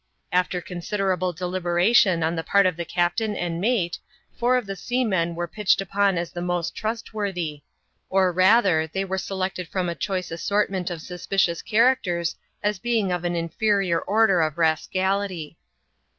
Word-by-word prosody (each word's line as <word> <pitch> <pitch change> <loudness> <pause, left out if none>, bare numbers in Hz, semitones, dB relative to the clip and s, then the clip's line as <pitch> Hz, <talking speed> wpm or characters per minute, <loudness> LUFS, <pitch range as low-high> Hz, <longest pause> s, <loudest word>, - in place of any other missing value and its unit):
After 180 0 +1
considerable 185 +1 -2
deliberation 180 +1 +2
on 165 +2 0
the 165 - -3
part 200 +2 +3
of 180 -2 +2
the 170 0 -4
captain 180 +6 0
and 170 -2 -3
mate, 200 -6 0 0.4
four 245 +1 +2
of 250 - -2
the 195 0 -5
seamen 195 -8 0
were 175 0 -3
pitched 210 +3 +1
upon 195 0 +1
as 170 -1 -3
the 175 - -5
most 175 -1 -1
trustworthy; 200 -8 -3 0.5
or 190 -1 +3
rather 185 -3 +4
they 190 +5 -3
were 190 0 -2
selected 185 -2 -3
from 180 -1 -2
a - - -1
choice 185 0 -3
assortment 190 +1 -1
of 170 -3 -6
suspicious 180 -1 -1
characters 215 -8 +2 0.3
as 210 -2 0
being 225 -4 0
of 180 -1 -2
an 175 0 -1
inferior 180 +1 +1
order 205 -3 +3
of 155 -1 -1
rascality. 185 +1 0
185 Hz, 155 wpm, -24 LUFS, 175-200 Hz, 0.5 s, rather